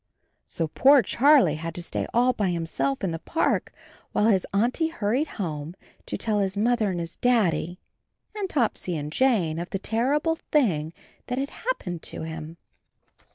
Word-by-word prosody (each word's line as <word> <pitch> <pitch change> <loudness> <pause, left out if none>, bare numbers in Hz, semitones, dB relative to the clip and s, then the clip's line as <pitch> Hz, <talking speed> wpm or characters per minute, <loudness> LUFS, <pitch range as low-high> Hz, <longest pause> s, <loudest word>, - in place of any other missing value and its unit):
So 165 - -2
poor 270 - +5
Charlie 270 - +5
had 165 0 -5
to 175 - -2
stay - - -3
all 245 +2 +3
by 205 -5 0
himself 165 -5 -2
in 185 - 0
the 165 - -4
park, 325 - 0 0.4
while 210 - +2
his 190 -4 +2
Auntie 240 +11 +1
hurried 270 -1 -1
home 160 -4 -4 0.3
to - - -3
tell 215 -2 0
his 195 0 -1
Mother 225 0 +2
and 180 -2 -2
his 170 0 -6
Daddy 190 -8 +1 0.6
and 400 -3 -3
Topsy 220 - -1
and 150 0 -5
Jane 190 -12 +2
of 175 - -5
the - - -2
terrible 280 - 0
thing 170 - +2 0.4
that 250 - -2
had 275 +1 -1
hap^ - - -3
pened 175 -3 -4
to - - -7
him. 160 0 -7
200 Hz, 170 wpm, -25 LUFS, 165-255 Hz, 0.6 s, poor